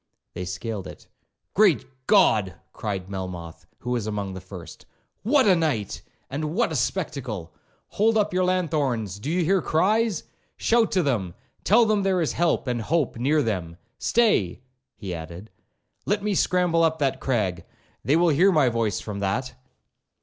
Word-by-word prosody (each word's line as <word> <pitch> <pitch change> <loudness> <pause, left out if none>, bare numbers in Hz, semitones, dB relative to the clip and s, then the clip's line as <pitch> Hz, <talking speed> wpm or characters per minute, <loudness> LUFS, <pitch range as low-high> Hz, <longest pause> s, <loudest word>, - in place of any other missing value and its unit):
They 90 - -5
scaled 95 +3 -5
it. - - -12 0.5
'Great 195 -6 +4 0.2
God!' 110 - +4 0.2
cried 95 -4 -4
Melmoth, 90 -4 -7
who 125 - -4
was 120 -4 -1
among 100 -2 -3
the 95 - -7
first, 90 -2 -11 0.3
'what 260 +5 +3
a 190 - +6
night! 145 - -1 0.3
and 150 +4 -4
what 235 -4 +1
a - - -2
spectacle!—Hold 140 - -2
up 210 -2 +1
your 185 0 +2
lanthorns—do 140 - -1
you 175 +1 +1
hear 190 +2 +3
cries?—shout 220 +5 0
to 185 -3 +3
them—tell 130 - +1
them 215 -2 +2
there 190 -2 +1
is 160 - 0
help 170 -3 +1
and 120 -3 -1
hope 155 +4 0
near 145 +5 +2
them.—Stay,' 105 - 0 0.3
he 95 -5 -6
added, 85 +5 -8 0.6
'let 205 0 0
me 210 -1 0
scramble 180 -2 +2
up 160 -1 +2
that 135 -3 0
crag—they 105 - -2
will 170 +1 +4
hear 175 +6 +4
my 150 -7 +4
voice 115 -4 -1
from 105 -2 -6
that.' 115 +7 -2
135 Hz, 145 wpm, -25 LUFS, -, 0.6 s, a